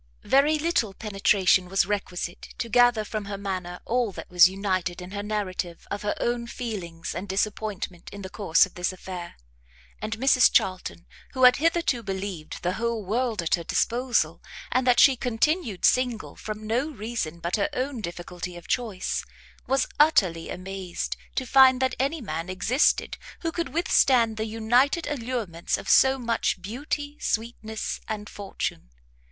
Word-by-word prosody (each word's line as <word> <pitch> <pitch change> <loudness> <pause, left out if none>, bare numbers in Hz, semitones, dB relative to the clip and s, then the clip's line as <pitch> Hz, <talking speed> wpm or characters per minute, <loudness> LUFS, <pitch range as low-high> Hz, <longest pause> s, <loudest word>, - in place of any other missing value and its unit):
Very 290 +3 +4
little 295 - 0
penetration 195 -3 +2
was 195 -1 +2
requisite, 180 -3 -4
to 235 - -3
gather 240 -1 +4
from 215 -1 -4
her 200 0 -5
manner 185 -3 -4
all 240 -2 0
that - - -9
was 180 0 +7
united 185 -2 -2
in 180 +1 -9
her 200 0 -4
narrative 195 -5 -3
of 205 - -3
her 205 - -1
own 240 0 -1
feelings 190 -10 -5
and 185 +4 -6
disappointment 195 -2 -3
in 200 0 -9
the 190 - -6
course 180 -5 +4
of 190 - -15
this 180 +1 -1
affair; 180 -2 -8 0.7
and 215 +1 -3
Mrs 255 0 +5
Charlton, 185 -2 0 0.3
who 260 -1 -1
had 250 0 +8
hitherto 330 -5 +1
believed 190 -7 -5
the 180 +1 0
whole 235 -3 -1
world 225 -1 0
at 165 - -1
her 170 - +2
disposal, 245 +7 0 0.3
and 255 0 +1
that 245 - +5
she 270 - +7
continued 245 - 0
single 250 -3 +1
from 215 0 -7
no 245 +7 0
reason 215 - -4
but 170 +1 -1
her 300 - +1
own 260 -3 -3
difficulty 175 -1 -6
of 175 - -12
choice, 220 -7 -2 0.4
was 270 0 +2
utterly 185 - +3
amazed 185 -1 -4 0.2
to 260 - -1
find 260 0 +6
that 260 -1 +1
any 280 +4 0
man 165 -4 -4
existed 220 +9 +1 0.2
who 330 - -1
could 335 0 -3
withstand 255 -7 +3
the 220 - -1
united 240 +8 +2
allurements 235 - -2
of - - -9
so 265 0 +5
much 235 -5 0
beauty, 285 - -4
sweetness, 220 -1 -3
and 210 -1 -5
fortune. 195 - -5
215 Hz, 160 wpm, -26 LUFS, 185-250 Hz, 0.7 s, had